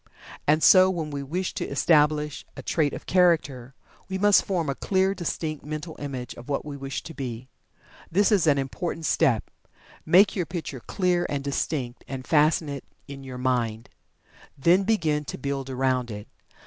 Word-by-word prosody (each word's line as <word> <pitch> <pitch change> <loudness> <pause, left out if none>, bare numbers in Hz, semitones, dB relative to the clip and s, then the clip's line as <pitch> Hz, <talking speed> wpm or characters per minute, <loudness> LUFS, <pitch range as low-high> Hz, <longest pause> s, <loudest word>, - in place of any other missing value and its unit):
And 155 +2 +3
so, 185 -1 +7
when 165 -5 -3
we 140 -1 -4
wish 175 +7 -3
to - - -3
establish 150 0 +2
a - - -7
trait 150 -4 +1
of - - -8
Character, 145 -8 +2 0.3
we 190 - -2
must 205 +1 +5
form 175 -5 -1
a 140 - 0
clear, 190 +6 +1
distinct 160 -4 -4
Mental 155 +2 -6
Image 130 -4 -5
of 120 - -12
what 140 - -1
we 145 -2 -6
wish 135 0 -5
to 165 - -9
be. 130 -3 -6 0.6
This 200 +6 +3
is 190 -6 +3
an 145 -2 +4
important 160 +5 -3
step. 115 -7 +1 0.5
Make 185 +6 +5
your 180 -5 -1
picture 165 -6 -5
clear 180 - 0
and 140 -1 -2
distinct, 135 -3 -3
and 130 -1 -6
fasten 155 0 +3
it 140 -2 -5 0.2
in 140 -1 -9
your 130 -1 -7
mind. 120 -3 -1 0.7
Then 175 +7 +4
begin 160 -9 +1
to - - -6
build 135 0 -4
around 130 -1 0
it. 105 -1 -7
150 Hz, 175 wpm, -25 LUFS, 135-170 Hz, 0.7 s, so